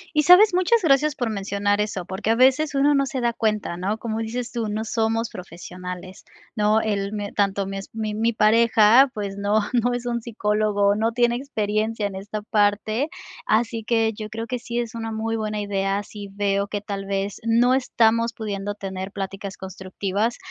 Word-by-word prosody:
¿Y 300 - +5
sabes? 365 +4 +7
Muchas 370 +4 +3
gracias 295 0 +3
por 245 -6 -2
mencionar 205 0 0
eso, 195 -4 -3
porque 190 +4 -4
a 225 - +4
veces 270 +4 +3
uno 285 +2 +4
no 275 -1 +2
se 265 - -3
da 235 -1 0
cuenta, 215 -6 -1
¿no? 195 +5 -2
Como 225 -1 -4
dices 235 +2 -4
tú: 230 -2 -2
"No 215 +2 -3
somos 225 0 -1
profesionales", 180 +1 -9 0.3
¿no? 215 0 +3
El 200 -1 -2
me 205 -1 -4
tanto 200 -1 0
mi 195 0 -5
es 195 - -8
mi 215 -1 -2
mi 225 +2 +1
pareja, 225 +3 +5
pues, 200 -2 -4
no 205 +2 +2
no 245 0 +2
es 245 - -5
un 235 -1 -2
psicólogo, 210 -2 +1
no 225 +2 0
tiene 240 0 +2
experiencia 215 -4 -2
en 200 - -3
esta 205 +2 -6
parte, 215 +6 +1 0.4
así 225 0 +1
que 225 -1 +1
yo 215 0 -7
creo 225 +1 -5
que 250 0 -4
sí 235 0 -5
es 235 -2 -2
una 225 -1 -4
muy 225 +1 -2
buena 215 -1 -2
idea, 195 0 -1
si 205 0 -9
veo 200 0 -1
que 205 0 -4
tal 195 -1 -5
vez 195 0 -2
no 240 +3 +4
estamos 230 -2 +2
pudiendo 205 -2 -4
tener 190 -1 -6
pláticas 195 0 -6
constructivas. 190 +4 -3
215 Hz, 190 wpm, -23 LUFS, 200-235 Hz, 0.4 s, sabes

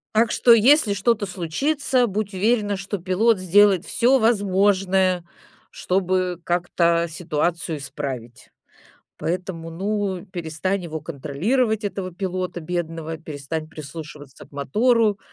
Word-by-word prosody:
Так 225 +1 +3
что, 240 - +5
если 235 0 +5
что-то 205 +1 +1
случится, 245 - 0
будь 205 0 -3
уверена, 205 +1 +1
что 195 +2 -4
пилот 190 +4 +2
сделает 190 0 +4
всё 240 +6 +3
возможное, 195 -4 +2 0.5
чтобы 185 -1 -1
как-то 170 -1 +1
ситуацию 165 0 -2
исправить. 130 -4 -7 0.7
Поэтому, 175 -1 -4
ну, 195 +1 -2
перестань 180 +1 -3
его 160 -2 -5
контролировать, 185 - -1
этого 195 -3 -4
пилота 185 -1 -3
бедного, 165 -1 -4
перестань 155 0 -6
прислушиваться 150 -2 -10
к - - -23
мотору. 215 - +2
185 Hz, 110 wpm, -22 LUFS, 165-205 Hz, 0.7 s, что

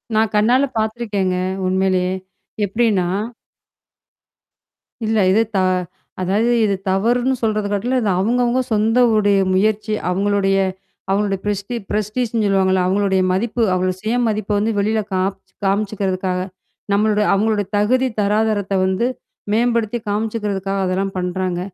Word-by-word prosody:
நான் 220 0 +2
கண்ணால 245 +6 +3
பார்த்துருக்கேங்க. 215 -4 -1 0.3
உண்மையிலேயே. 185 0 +1 0.5
எப்படின்னா? 205 -3 +1 2.0
இல்ல. 220 0 +1
இது 220 +3 +4
த - - +3 0.6
அதாவது 210 +6 +1
இது 200 -2 +2
தவறுன்னு 240 +7 +1
சொல்றது 215 -2 0
கட்டில 245 +6 0
இது 210 - 0
அவுவங்கவங்க 240 +5 +1
சொந்தவுடைய 215 -2 +3
முயற்சி, 215 +2 +1 0.2
அவங்களுடைய 195 +1 +1 0.5
அவங்களுடைய 195 -1 0
பிரெஸ்டி 205 +3 -2 0.2
பிரெஸ்டீஸ்ன்னு 215 +2 -1
சொல்லுவாங்கல்ல. 190 -1 +2
அவங்களுடைய 190 -1 +1
மதிப்பு 235 +5 -1
அவங்களோ 185 0 0
சுய 220 +3 -1
மதிப்ப 210 -1 -2
வந்து 220 +2 +1
வெளில 220 +2 +1
காப் 190 +1 0 0.3
காமிச்சுக்கிறதுக்காக. 195 -2 -1 0.5
நம்மளோட 210 +1 +2
அவங்களுடைய 205 0 +1
தகுதி 255 +6 +2
தராதாரத்த 210 -1 +1
வந்து 190 +5 0 0.5
மேம்படுத்தி 235 0 +1
காமிச்சுக்கிறதுக்காக 205 -2 -2
அதெல்லாம் 190 +1 -1
பண்றாங்க. 180 0 -2
205 Hz, 110 wpm, -19 LUFS, 195-220 Hz, 2.0 s, இது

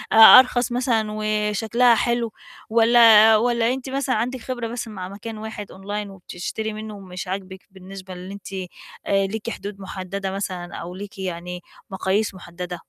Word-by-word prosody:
أرخص 245 +2 +8
مثلًا 240 -3 +1
وشكلها 215 +3 +2
حلو؟ 235 0 0 0.4
والّا 225 -1 +7
والّا 235 +1 +1
أنتِ 265 0 -6
مثلًا 270 -2 -1
عندِك 245 +3 -2
خبرة 240 -2 -4
بس 240 0 -5
مع 190 -4 -7
مكان 215 +2 -8
واحد 215 -1 -7
Online 205 +2 -5
وبتشتري 195 +3 -6
مِنُّه 215 0 -7
ومش 185 -2 -8
عاجبِك، 190 0 -6
بالنسبة 190 0 -10
للي 180 +2 -8
أنتِ 200 -1 -10 0.5
آآ، 195 -1 +2
ليكِ 220 - -6
حدود 200 -3 -7
مُحددة 190 0 -5
مثلًا، 185 -3 -5
أو 175 +2 -7
ليكِ 200 0 -9
يعني 180 -1 -5 0.3
مقاييس 195 +2 -1
مُحددة؟ 180 -1 -7
210 Hz, 150 wpm, -22 LUFS, 190-230 Hz, 0.5 s, أرخص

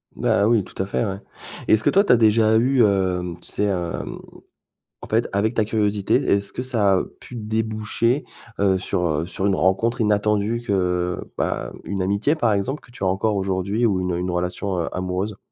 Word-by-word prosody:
Bah 100 - +2
oui, 115 -3 +3
tout 95 - -7
à 95 - 0
fait, 115 - -1
ouais. 95 -2 -4 0.5
Et - - +4
est-ce 110 - +4
que - - +4
toi, 195 - +5
tu 200 - +2
as 125 - +7
déjà 110 0 +4
eu, 125 +2 +3
hem, 90 -4 0
tu - - -12
sais, 105 - 0
hem, 90 -4 -3 0.8
en - - -9
fait, 115 +2 +1
avec 105 +4 0
ta 115 - +2
curiosité, 105 -2 0
est-ce 100 0 +2
que 125 - -4
ça 110 -7 +2
a 95 - +1 0.2
pu 125 - -10
déboucher, 110 +3 -1 0.3
heu, 95 -1 +3
sur, 90 -1 -1
heu, 80 +1 -1
sur 95 +2 -3
une 100 - +3
rencontre 115 +7 +1
inattendue 105 +2 +1
que, 90 -4 0 0.2
bah, - - -2
une 100 -1 -3
amitié, 100 +9 +1
par 120 -8 +1
exemple, 120 +9 -2
que - - -19
tu 120 - -8
as - - +2
encore 100 +3 0
aujourd'hui 100 +4 0
ou 95 -4 +1
une 90 -1 -1
une 90 +1 -2
relation, 90 +2 -2
heu, 85 - -2
amoureuse? 95 +3 -3
100 Hz, 205 wpm, -22 LUFS, 95-110 Hz, 0.8 s, as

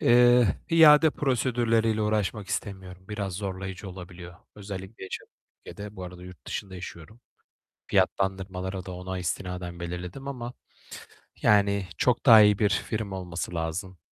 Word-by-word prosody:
eee, 120 -2 +5 0.2
iade 160 -1 +7
prosedürleriyle 115 -5 +1
uğraşmak 105 -1 -1
istemiyorum. 95 -2 -5
Biraz 100 -2 -3
zorlayıcı 95 0 -5
olabiliyor, 90 -1 -10 0.2
özellikle 100 0 -8
yaşadığım 95 - -8 0.3
ülkede. 105 +1 -8
Bu 95 - -6
arada 90 0 -10
yurt 90 -4 -13
dışında 95 -2 -5
yaşıyorum. 90 +4 -10 0.7
Fiyatlandırmaları 95 -1 -1
da 95 - -6
ona 90 +1 -5
istinaden 90 -1 -4
belirledim 90 +10 -6
ama, 125 -3 -5 0.9
yani, 100 -2 +3
çok 125 -2 +1
daha 115 -4 +10
iyi 105 -1 +5
bir 105 - +3
firma 105 -2 -2
olması 90 -1 -5
lazım. 85 +3 -4
95 Hz, 130 wpm, -27 LUFS, 90-110 Hz, 0.9 s, daha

